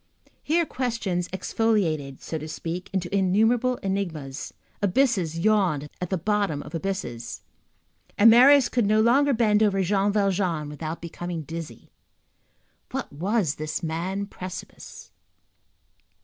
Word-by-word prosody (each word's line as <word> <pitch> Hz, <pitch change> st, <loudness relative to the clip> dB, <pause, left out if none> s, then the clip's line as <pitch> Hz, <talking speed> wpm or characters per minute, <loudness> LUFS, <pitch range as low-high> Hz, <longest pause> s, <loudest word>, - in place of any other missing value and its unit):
Here 335 Hz, +3 st, +1 dB
questions 230 Hz, -, -2 dB
exfoliated, 180 Hz, -8 st, -1 dB
so 160 Hz, -, -4 dB
to 155 Hz, -, -7 dB
speak, 165 Hz, +3 st, -5 dB
into 190 Hz, 0 st, -2 dB
innumerable 225 Hz, +6 st, +2 dB
enigmas, 165 Hz, -9 st, -3 dB, 0.3 s
abysses 200 Hz, -, +1 dB
yawned 175 Hz, -7 st, +1 dB
at 180 Hz, -, -3 dB
the 190 Hz, -, 0 dB
bottoms 195 Hz, -4 st, 0 dB
of -, -, -12 dB
abysses, 165 Hz, -10 st, -4 dB, 0.8 s
and 210 Hz, -, +7 dB
Marius 260 Hz, +2 st, +7 dB
could 240 Hz, -4 st, +1 dB
no 215 Hz, +1 st, +3 dB
longer 270 Hz, +6 st, +4 dB
bend 220 Hz, -4 st, +3 dB
over 195 Hz, -3 st, +3 dB
Jean 200 Hz, +2 st, +2 dB
Valjean 190 Hz, -7 st, 0 dB
without 155 Hz, +3 st, -6 dB
becoming 170 Hz, 0 st, -5 dB
dizzy. 160 Hz, -6 st, -8 dB, 1.0 s
What -, -, -5 dB
was 180 Hz, 0 st, 0 dB
this 155 Hz, +2 st, -4 dB
man 175 Hz, +5 st, -2 dB
precipice? 185 Hz, -2 st, -9 dB
190 Hz, 120 wpm, -25 LUFS, 165-215 Hz, 1.0 s, and